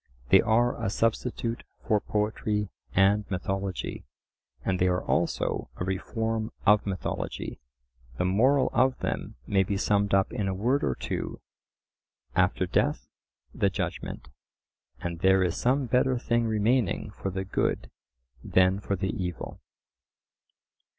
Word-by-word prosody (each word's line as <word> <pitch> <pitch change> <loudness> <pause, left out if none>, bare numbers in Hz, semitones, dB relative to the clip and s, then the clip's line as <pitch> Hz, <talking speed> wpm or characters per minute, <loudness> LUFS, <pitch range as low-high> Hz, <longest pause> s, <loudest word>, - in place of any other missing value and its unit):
They - - +8
are 120 +2 +2
a - - +1
substitute 115 +2 -1 0.2
for 110 -3 +4
poetry 105 -1 -1 0.3
and 100 +2 +4
mythology; 95 0 -3 0.6
and 95 -1 +1
they 90 - +3
are 90 0 +1
also - - 0
a - - -4
reform 110 +4 -2
of 105 0 +5
mythology. 95 -2 -4 0.6
The - - +1
moral 130 +8 +3
of 130 +1 +3
them - - -3
may 95 +5 +3
be 100 +1 0
summed 100 0 +2
up 95 +2 +2
in 105 -5 -1
a 95 - -1
word 125 +9 +1
or 65 - +1
two: - - -4 1.0
After - - +2
death - - 0 0.5
the - - +2
Judgment; 65 - -4 0.7
and 85 -1 -4
"there 95 +1 +4
is 90 -2 0
some 130 +3 +1
better 125 +2 +2
thing 120 -1 +1
remaining 110 +1 +1
for 95 - -4
the 95 0 -3
good 65 -9 -1 0.5
than 95 +1 +3
for 100 0 -2
the 95 +1 -1
evil." 90 -5 -5
100 Hz, 135 wpm, -28 LUFS, 95-115 Hz, 1.0 s, They